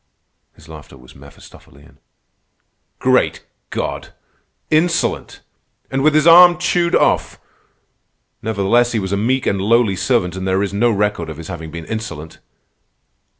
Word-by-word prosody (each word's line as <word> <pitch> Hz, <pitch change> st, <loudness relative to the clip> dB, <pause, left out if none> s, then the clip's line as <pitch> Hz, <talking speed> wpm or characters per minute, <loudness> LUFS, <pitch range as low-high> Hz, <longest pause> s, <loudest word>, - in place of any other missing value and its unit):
His 75 Hz, -, -19 dB
laughter 75 Hz, -3 st, -13 dB
was 65 Hz, -1 st, -17 dB
Mephistophelian. 70 Hz, +2 st, -18 dB, 1.0 s
"Great -, -, 0 dB, 0.2 s
God! -, -, -5 dB, 0.6 s
Insolent! 170 Hz, +2 st, 0 dB, 0.5 s
And 135 Hz, 0 st, -1 dB
with 155 Hz, +1 st, +3 dB
his 155 Hz, 0 st, +3 dB
arm 175 Hz, +1 st, +8 dB
chewed 175 Hz, -1 st, 0 dB
off! -, -, +1 dB, 1.0 s
Nevertheless 110 Hz, +3 st, +1 dB
he 115 Hz, -, 0 dB
was 95 Hz, -1 st, -5 dB
a -, -, +1 dB
meek 125 Hz, +6 st, -1 dB
and 100 Hz, -1 st, -1 dB
lowly 110 Hz, -1 st, +2 dB
servant, 90 Hz, -4 st, -1 dB
and 95 Hz, 0 st, -5 dB
there 95 Hz, +1 st, +1 dB
is 100 Hz, -, -4 dB
no 115 Hz, +4 st, +2 dB
record 105 Hz, -6 st, -1 dB
of 80 Hz, -, -8 dB
his 80 Hz, +1 st, -10 dB
having 80 Hz, -3 st, -7 dB
been 85 Hz, +1 st, -8 dB
insolent." 80 Hz, -8 st, -7 dB
105 Hz, 140 wpm, -18 LUFS, 85-130 Hz, 1.0 s, arm